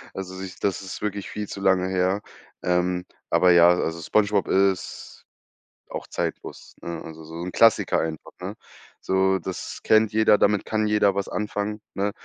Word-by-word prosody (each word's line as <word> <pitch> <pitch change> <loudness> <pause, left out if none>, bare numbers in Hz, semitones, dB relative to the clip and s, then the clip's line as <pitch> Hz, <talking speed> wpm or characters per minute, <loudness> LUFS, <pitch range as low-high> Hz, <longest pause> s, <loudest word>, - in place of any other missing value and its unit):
Also, 95 -1 -6
so, 95 - -6
ich 90 -2 -9
das 100 -1 -1
ist 95 -2 -7
wirklich 100 -1 -3
viel 105 -1 -5
zu 100 - -7
lange 95 -1 +3
her. 95 +2 +1 0.4
Ähm. 90 0 0 0.2
Aber 90 -1 +5
ja, 85 0 +7
also, 85 -2 0
Spongebob 100 +3 +1
ist 95 -1 -1 0.6
auch - - -7
zeitlos, - - -5
ne? 85 0 -6
Also, 80 0 -10
so 80 +1 -10
'n 90 - -4
Klassiker 115 -2 +4
einfach, 80 -1 -4
ne? - - -5 0.5
So, 95 0 +2
das 95 +1 -6
kennt 110 0 +4
jeder, 110 -1 +4
damit 105 -1 +2
kann 110 -1 0
jeder 105 -2 +3
was 100 0 -2
anfangen, 105 0 -3
ne? 100 +1 -1
95 Hz, 170 wpm, -24 LUFS, 90-105 Hz, 0.6 s, ja